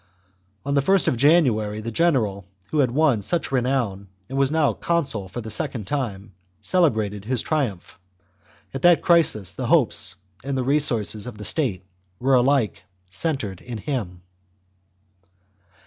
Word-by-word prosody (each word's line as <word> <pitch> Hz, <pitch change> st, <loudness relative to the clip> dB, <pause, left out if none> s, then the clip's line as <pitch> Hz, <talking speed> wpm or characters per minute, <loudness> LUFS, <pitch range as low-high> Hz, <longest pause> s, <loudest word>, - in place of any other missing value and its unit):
On 140 Hz, -, -1 dB
the 140 Hz, -, +3 dB
first 190 Hz, +7 st, +2 dB
of -, -, +2 dB
January 120 Hz, -7 st, +3 dB
the 115 Hz, +2 st, -5 dB
general 110 Hz, -, 0 dB, 0.2 s
who 155 Hz, -, 0 dB
had 130 Hz, -4 st, +3 dB
won 135 Hz, -4 st, +2 dB
such 165 Hz, -, -2 dB
renown, 125 Hz, -7 st, -1 dB, 0.2 s
and 135 Hz, -, -6 dB
was 135 Hz, -1 st, +2 dB
now 155 Hz, -2 st, +2 dB
consul 140 Hz, -, -1 dB
for 120 Hz, +5 st, -6 dB
the 110 Hz, 0 st, -7 dB
second 110 Hz, 0 st, -2 dB
time, 105 Hz, -6 st, -4 dB, 0.3 s
celebrated 110 Hz, -, +1 dB
his 125 Hz, 0 st, -1 dB
triumph. 125 Hz, -, -3 dB, 0.7 s
At 135 Hz, -, -5 dB
that 175 Hz, +1 st, +5 dB
crisis 110 Hz, -, +3 dB
the -, -, -4 dB
hopes -, -, +3 dB, 0.3 s
and 135 Hz, 0 st, -3 dB
the 130 Hz, -, 0 dB
resources 125 Hz, -6 st, +1 dB
of 120 Hz, -4 st, -8 dB
the 105 Hz, -, -7 dB
state 100 Hz, -, 0 dB, 0.3 s
were 135 Hz, +2 st, +1 dB
alike 125 Hz, -5 st, +2 dB, 0.3 s
centred 105 Hz, -, -1 dB
in 120 Hz, -2 st, -7 dB
him. 105 Hz, -9 st, -5 dB
125 Hz, 150 wpm, -23 LUFS, 105-145 Hz, 0.7 s, that